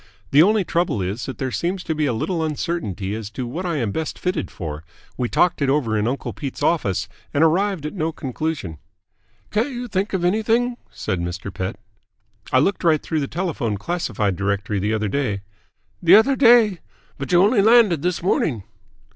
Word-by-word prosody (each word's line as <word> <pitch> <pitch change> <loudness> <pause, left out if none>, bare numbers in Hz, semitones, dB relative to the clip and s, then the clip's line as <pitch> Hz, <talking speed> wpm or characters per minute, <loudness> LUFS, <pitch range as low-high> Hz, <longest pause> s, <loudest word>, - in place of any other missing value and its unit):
"The 145 - +7
only 210 +3 +4
trouble 170 - 0
is 100 +5 -3
that 130 - -6
there 130 -1 -2
seems 180 +7 -2
to 160 - -2
be 155 -1 0
a - - +1
little 160 +9 -1
uncertainty 145 - -3
as 110 -2 -5
to 125 +3 -5
what 165 +10 -4
I 170 - -1
am 115 -8 -1
best 160 +8 -3
fitted 180 0 -2
for. 80 -2 -6 0.3
We 125 -1 -2
talked 175 -4 +2
it 140 - +2
over 135 -6 +1
in 105 +1 +1
uncle 135 +3 -3
Pete's 140 -4 -6
office 100 - +1 0.3
and 145 - +4
arrived 180 0 +2
at 150 - -4
no 165 -4 -1
conclusion." 140 - -4 0.7
"Can't 220 +6 +1
you 245 -2 -5
think 200 -1 -2
of 180 -2 0
anything?" 225 +5 +1
said 95 - -3
Mr. 90 +2 -5
Pett. 95 +1 -3 0.8
"I - - +4
looked 185 +10 +1
right 160 -3 +4
through 160 - -1
the 140 - -2
telephone 155 - -2
classified 105 - -1
directory 100 +2 -1
the 105 +3 -1
other 110 -1 -1
day 105 -5 -1 0.3
" - - -44
"The 175 +2 +7
other 265 +6 +5
day? 230 -8 +5 0.4
But 140 - -4
you 175 - +5
only 210 +1 +4
landed 215 -7 +5
this 175 0 -1
morning." 135 - +1
155 Hz, 195 wpm, -22 LUFS, -, 0.8 s, The